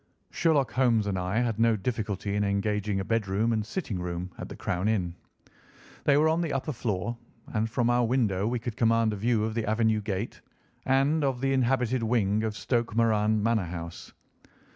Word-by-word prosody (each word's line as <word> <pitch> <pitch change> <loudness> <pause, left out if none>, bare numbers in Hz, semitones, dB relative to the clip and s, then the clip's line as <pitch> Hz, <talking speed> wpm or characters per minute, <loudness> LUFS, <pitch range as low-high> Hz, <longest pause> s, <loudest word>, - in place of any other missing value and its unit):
Sherlock 150 -6 +2
Holmes 120 -5 +2
and 95 -2 -1
I 95 +6 0
had 115 -3 -1
no 115 -1 +4
difficulty 105 -2 -3
in 105 - +1
engaging 100 0 0
a 95 - -3
bedroom 110 +1 0
and 110 -1 0
sitting 110 - -4
room 90 +1 -4
at - - -6
the - - -7
Crown 90 +3 -2
Inn. 95 -6 0 0.9
They 145 -1 +5
were 155 +2 +4
on 160 +2 +2
the 165 -3 -2
upper 135 +3 -2
floor, 115 0 -3 0.3
and 110 0 0
from 120 +1 0
our 120 0 +3
window 110 -5 +1
we 120 +2 0
could 115 -1 -5
command 115 -2 +2
a - - -2
view 110 +1 +1
of 110 0 -1
the 110 -2 -2
avenue 110 -1 +2
gate, 100 +2 -4 0.5
and 140 +4 +3
of 135 -3 0
the 135 +1 +1
inhabited 130 -1 +1
wing 110 -3 +1
of 110 -1 -2
Stoke 120 -3 -1
Moran 110 -2 +2
Manor 115 -4 +2
House. 85 -1 -7
110 Hz, 190 wpm, -28 LUFS, 105-120 Hz, 0.9 s, They